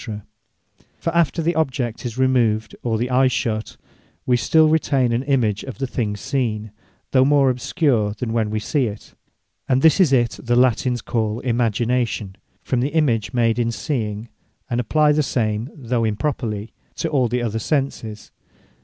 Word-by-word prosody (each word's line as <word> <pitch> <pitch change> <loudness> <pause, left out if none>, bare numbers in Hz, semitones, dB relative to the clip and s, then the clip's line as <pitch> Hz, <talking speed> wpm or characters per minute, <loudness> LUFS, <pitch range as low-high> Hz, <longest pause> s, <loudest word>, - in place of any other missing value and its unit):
For 165 0 -3
after 165 0 +2
the 170 +2 +1
object 130 -7 -2
is 115 0 -8
removed, 120 -4 +1
or 115 -2 -1
the 120 +3 -2
eye 130 +1 +4
shut, 110 -3 -2 0.5
wee 125 - +3
still 155 +6 +4
retain 140 -5 +2
an 120 +1 +1
image 125 -7 0
of 130 - -8
the 135 - -2
thing 115 -4 -2
seen, 110 -3 -2 0.4
though 130 -1 +5
more 140 -1 +4
obscure 125 - 0
than 115 +1 -4
when 110 -2 0
we 110 0 -1
see 130 +3 0
it. 105 0 -9 0.6
And 130 0 +2
this 160 +2 +5
is 175 -7 +5
it, 120 -3 +2
that 120 0 0
Latines 125 -1 +2
call 110 -2 -1
Imagination, 115 -3 0 0.3
from 125 - 0
the 130 +4 0
image 115 -9 +1
made 115 -1 +1
in 115 -1 +1
seeing; 115 -5 -3 0.4
and 120 - 0
apply 150 +5 +3
the 150 +1 +2
same, 115 -3 -1
though 125 -5 -2
improperly, 110 -2 -2 0.2
to - - -2
all 140 -6 +1
the 120 +1 -1
other 115 -1 -2
senses. 115 -5 -3
120 Hz, 165 wpm, -21 LUFS, 110-135 Hz, 0.6 s, though